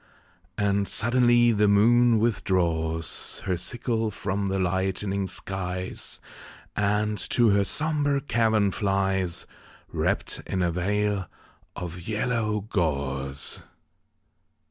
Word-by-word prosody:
And 100 -1 +1
suddenly 120 0 +3
the 105 -1 +3
moon 115 +3 +5
withdraws 85 -7 0
Her 95 - +1
sickle 115 +4 -1
from 100 0 -2
the 95 0 -1
lightening 95 +1 -1
skies, 90 -1 -4 0.6
And 105 0 0
to 120 -2 +4
her 100 0 +4
sombre 145 +1 +1
cavern 110 -6 +2
flies, 95 -4 0 0.4
Wrapped - - -1
in 95 -1 -1
a 85 - +1
veil 100 +2 0 0.5
of 90 -1 -7
yellow 110 -1 0
gauze. 70 - -2
100 Hz, 100 wpm, -26 LUFS, 90-110 Hz, 0.6 s, moon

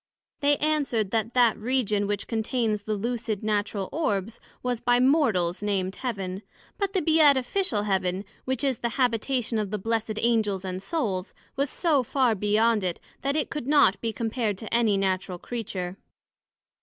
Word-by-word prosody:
They 290 0 +3
answered, 280 -9 0
That 230 +1 -1
that 240 -3 +5
Region 215 -4 0
which 205 -1 -2
contains 220 -1 -1
the 215 +1 -2
Lucid 225 -1 -3
natural 205 -2 -1
Orbs, 220 - -1 0.2
was 250 -2 -1
by 245 0 +3
Mortals 235 - +2
named 195 -2 -1
Heaven; 195 -7 -4 0.4
but 400 -1 -1
the 375 - +1
Beatifical 295 - +3
Heaven, 190 -1 0 0.2
which 260 -1 -1
is 265 -4 0
the 235 +1 -3
Habitation 245 -1 +1
of 210 -2 -2
the 210 - -2
Blessed 220 +1 -2
Angels 215 -5 +1
and 185 0 -4
Souls, 195 - -2 0.2
was 280 +1 0
so 310 -4 +2
far 250 -1 +2
beyond 210 +1 +2
it, 180 -2 -2 0.2
that 275 +1 0
it 305 - -1
could 295 -5 -4
not 285 -9 +4
be 230 - -1
compared 225 -2 -2
to 220 +3 -7
any 225 -4 +3
Natural 185 -2 -1
Creature. 190 -4 -5
225 Hz, 160 wpm, -26 LUFS, 200-255 Hz, 0.4 s, that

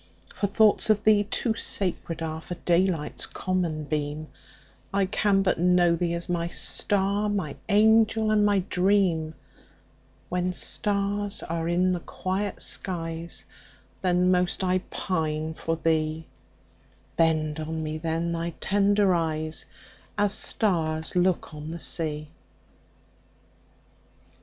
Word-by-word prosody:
My 200 - +2
thoughts 215 +1 +4
of 215 -1 +3
thee 210 -1 +4
too 225 +2 +1
sacred 180 -6 -1
areFor 160 +2 -5
daylight's 175 -3 +1
common 175 -5 -2
beam:I 150 +5 -5
can 195 0 +2
but 185 - +1
know 175 -1 +4
thee 170 0 -1
as 170 - -3
my 170 -1 -1
star, 200 +3 +1
My 190 -9 -2
angel 220 +1 +4
and 210 -1 +3
my 205 -2 +3
dream; 180 -5 +1 0.9
When 180 0 -1
stars 205 +1 -1
are 165 0 -3
in 180 +2 +2
the 180 - -1
quiet 190 +3 -3
skies, 165 -2 -3 0.6
Then 180 0 +2
most 180 +1 +1
I 185 0 +2
pine 160 -3 -2
for 165 +1 -2
thee; 160 -1 0 0.9
Bend 155 -2 +1
on 160 0 -4
me 155 0 -4
then 165 +1 -1
thy 170 0 -3
tender 200 -1 +3
eyes, 155 -2 -1 0.5
As 205 -1 +2
stars 160 -8 0
look 180 -2 +1
on 150 +1 -7
the 165 - -5
sea! 155 -2 -3
175 Hz, 120 wpm, -26 LUFS, 160-200 Hz, 0.9 s, thoughts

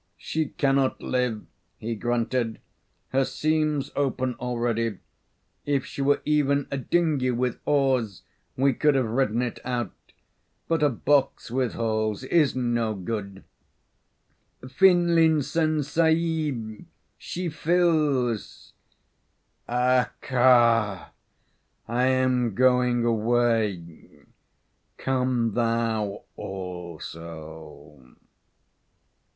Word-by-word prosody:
"She 160 -1 -2
cannot 135 -1 +1
live," 125 -4 -1 0.3
he 115 +2 -4
grunted. 115 +1 -1 0.5
"Her 135 +1 +2
seams 155 0 -1
open 130 -2 -1
already. 115 -3 -1 0.7
If 140 -2 0
she - - -6
were 140 +1 +2
even 145 -2 +1
a 140 - -1
dinghy 150 -3 +1
with 125 0 -1
oars 130 -8 +1 0.3
we 135 +1 +3
could 150 +3 +2
have 130 -2 +2
ridden 120 0 0
it 120 - -4
out; 120 -1 -2 0.8
but 165 -1 0
a 150 - +4
box 135 0 0
with 125 -2 0
holes 110 -1 -1
is 150 +1 +2
no 120 -3 0
good. 100 0 -5 1.2
Finlinson 160 -2 +3
Sahib, 155 -7 0 0.4
she 180 0 -4
fills." 155 - 0 1.0
"Accha! 120 -4 +2 0.8
I 120 +2 +1
am 130 -4 +1
going 125 -1 +3
away. 110 -6 -1 0.7
Come 125 -4 0
thou 115 -3 -1
also." 80 -6 -9
125 Hz, 90 wpm, -25 LUFS, 115-140 Hz, 1.2 s, a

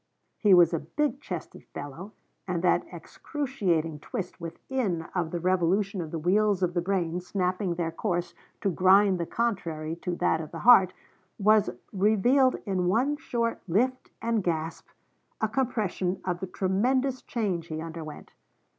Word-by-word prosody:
He 205 -4 +6
was 175 -1 +6
a 165 - +1
big 280 - -2
chested - - -7
fellow, 170 +9 -7 0.3
and 175 -2 -2
that 180 - +3
excruciating 185 - -2
twist 180 +4 -6
within 175 +1 -3
of 175 -3 -1
the 175 - -3
revolution 185 +2 +1
of 160 - -5
the 165 - -4
wheels 195 +3 +2
of 175 -1 +1
the 175 - +1
brain 175 -2 -1
snapping 180 0 -1
their 165 -1 -2
course 175 0 -2 0.3
to 195 - +1
grind 190 +1 +5
the 170 - -2
contrary 165 -9 -2
to 175 0 -3
that 160 - +1
of 155 - -7
the - - -8
heart, 195 -7 +8 0.5
was 215 0 +4 0.2
revealed 220 +7 +4
in 185 -3 0
one 250 +10 +2
short 235 -7 -2
lift 250 +9 0
and 230 -3 +1
gasp, 165 -1 -2 0.5
a 220 - +1
compression 210 -7 -1
of 180 -2 -1
the 190 - -4
tremendous 250 +9 0
change 190 -8 -2
he 155 -1 -4
underwent. 160 -2 -8
185 Hz, 155 wpm, -27 LUFS, 170-220 Hz, 0.5 s, heart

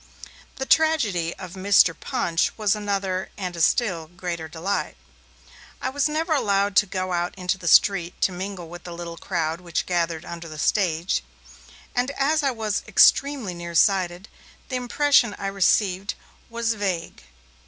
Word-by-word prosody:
The 265 - -4
tragedy 235 - +2
of 185 -3 -9
Mr. 190 -2 +4
Punch 170 -6 -1
was 215 -2 +2
another, 195 -3 -2
and 180 -3 -4
a 170 - -4
still 170 -4 +1
greater 175 -1 -5
delight. 170 +6 -3 0.8
I 260 - -2
was 285 +2 +1
never 320 +2 0
allowed 200 -7 +1
to 210 - +5
go 185 0 -3
out 175 0 -1
into 180 +1 -1
the 170 - -6
street 175 0 +4
to - - +3
mingle 185 -1 -6
with 175 +1 -10
the 175 - -8
little 170 -1 -7
crowd 165 -2 -2
which 170 -2 -2
gathered 170 -2 -1
under 170 -1 -8
the 155 - -9
stage, 170 - 0 0.7
and 245 +2 0
as 305 +3 +2
I 280 - +2
was 220 -4 -2
extremely 250 0 +4
near 170 0 -7
sighted, 185 0 +2 0.4
the 260 - -3
impression 250 -2 +2
I - - -6
received 195 0 +1 0.3
was 230 -1 -1
vague. 195 -6 -3
190 Hz, 155 wpm, -24 LUFS, 175-220 Hz, 0.8 s, to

